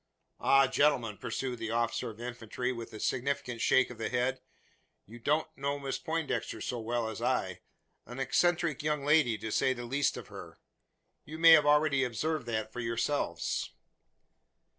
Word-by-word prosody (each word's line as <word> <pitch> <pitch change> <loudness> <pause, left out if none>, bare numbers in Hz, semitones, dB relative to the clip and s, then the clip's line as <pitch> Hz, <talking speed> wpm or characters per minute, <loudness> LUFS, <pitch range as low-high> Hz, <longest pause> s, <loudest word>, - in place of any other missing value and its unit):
"Ah, 135 0 +5
gentlemen!" 125 -6 +2
pursued 125 -3 -4
the 115 - -4
officer 115 0 -1
of 110 0 -11
infantry, 125 +1 -4
with 115 -2 -7
a 110 - -9
significant 125 -2 -2
shake 130 -1 +3
of 120 - -11
the 115 - -2
head. 125 +1 0 0.6
"You 115 +4 -12
don't 150 +6 +1
know 140 +1 -2
Miss 140 -1 -4
Poindexter, 150 -9 -2
so 120 +3 -3
well 115 0 -2
as 110 -2 -6
I. - - -1 0.5
An 125 - -8
eccentric 170 +1 +1
young 150 -1 -1
lady 145 -7 +4
to 110 +1 -5
say 130 - +2
the 120 -1 -7
least 140 +4 0
of - - -9
her. - - -10 0.7
You 155 - -8
may 165 0 +8
have 150 -2 +7
already 150 -2 +4
observed 135 +3 -2
that 110 -1 -3
for - - -6
yourselves." 115 - -1
125 Hz, 165 wpm, -31 LUFS, 115-145 Hz, 0.7 s, may